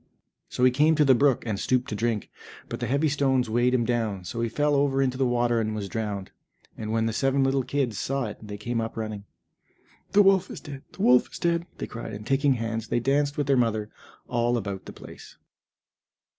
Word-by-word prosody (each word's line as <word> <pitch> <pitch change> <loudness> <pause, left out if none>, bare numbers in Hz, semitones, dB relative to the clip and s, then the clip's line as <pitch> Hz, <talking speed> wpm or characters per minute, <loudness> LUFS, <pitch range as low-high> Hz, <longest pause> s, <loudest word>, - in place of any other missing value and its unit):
So 125 - -2
he 130 - +6
came 150 +5 +3
to 150 -1 +4
the 135 - +6
brook, 135 0 +2
and 105 -4 -2
stooped 125 +2 +1
to 105 - -3
drink, 110 -1 -2 0.4
but - - -5
the 120 - -2
heavy 140 +6 +2
stones 135 -5 +1
weighed 120 +2 +2
him 120 -2 +1
down, 110 -5 -1
so 115 +6 -4
he 115 - 0
fell 145 +4 +1
over 140 -1 +2
into 130 -2 +1
the 130 0 +1
water 120 -1 +1
and 110 0 -2
was 100 -2 -4
drowned. 100 -2 -4 0.4
And 110 0 -5
when 115 0 +1
the 115 - -1
seven 135 +3 +1
little 135 0 +2
kids 130 -5 -2
saw 135 -1 -1
it 105 - -7
they 105 -1 -7
came 115 +2 -2
up 115 0 -5
running. 110 -2 -5 0.9
"The 205 +1 +7
wolf 190 -1 +4
is - - -7
dead, 140 -2 -9
the - - -4
wolf 125 0 +5
is - - -7
dead!" 170 0 0
they - - -4
cried, 115 -1 -7
and 105 +1 -7
taking 135 +2 +2
hands, 115 -1 -3
they - - 0
danced 140 +3 +1
with 145 - 0
their 135 0 +3
mother 110 -4 0 0.4
all 120 0 +1
about 100 -3 -5
the - - -8
place. - - -13
120 Hz, 225 wpm, -26 LUFS, 110-135 Hz, 0.9 s, The